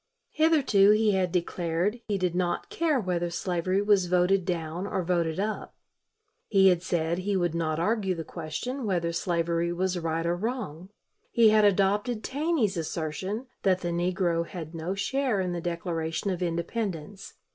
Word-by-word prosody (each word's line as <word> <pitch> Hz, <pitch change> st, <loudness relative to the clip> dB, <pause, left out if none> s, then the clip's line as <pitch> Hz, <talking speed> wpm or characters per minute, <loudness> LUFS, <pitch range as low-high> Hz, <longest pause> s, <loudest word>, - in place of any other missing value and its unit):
Hitherto 290 Hz, -11 st, +4 dB
he 215 Hz, 0 st, +3 dB
had 185 Hz, -3 st, +1 dB
declared 175 Hz, +5 st, -1 dB
he 205 Hz, -2 st, 0 dB
did 180 Hz, -2 st, 0 dB
not 180 Hz, -, -1 dB
care 335 Hz, -9 st, +1 dB
whether 175 Hz, -4 st, -1 dB
slavery 180 Hz, +2 st, -1 dB
was 205 Hz, -3 st, +3 dB
voted 180 Hz, +1 st, +2 dB
down 175 Hz, +1 st, -3 dB
or 190 Hz, -, -1 dB
voted 170 Hz, -1 st, 0 dB
up. 215 Hz, +2 st, -3 dB, 0.7 s
He 195 Hz, -2 st, +5 dB
had 175 Hz, -2 st, +2 dB
said 170 Hz, -1 st, -1 dB
he 195 Hz, +1 st, 0 dB
would 175 Hz, -3 st, 0 dB
not 160 Hz, -2 st, -1 dB
argue 195 Hz, 0 st, 0 dB
the 165 Hz, -, -4 dB
question 195 Hz, -, -5 dB
whether 170 Hz, -3 st, 0 dB
slavery 170 Hz, 0 st, 0 dB
was 180 Hz, +1 st, -1 dB
right 165 Hz, 0 st, -2 dB
or 170 Hz, +1 st, +1 dB
wrong. 190 Hz, -, -4 dB, 0.4 s
He 230 Hz, -2 st, +5 dB
had 215 Hz, -1 st, +5 dB
adopted 205 Hz, +4 st, +2 dB
Taney's 280 Hz, -, 0 dB
assertion 165 Hz, -, -3 dB, 0.2 s
that 185 Hz, -2 st, +2 dB
the 175 Hz, -, -2 dB
negro 175 Hz, -1 st, 0 dB
had 165 Hz, -3 st, -7 dB
no 165 Hz, +3 st, -3 dB
share 255 Hz, +1 st, 0 dB
in 185 Hz, -1 st, -1 dB
the 170 Hz, -, -3 dB
Declaration 170 Hz, +1 st, -2 dB
of 180 Hz, -1 st, -4 dB
Independence. 175 Hz, +1 st, -3 dB
180 Hz, 160 wpm, -27 LUFS, 170-205 Hz, 0.7 s, He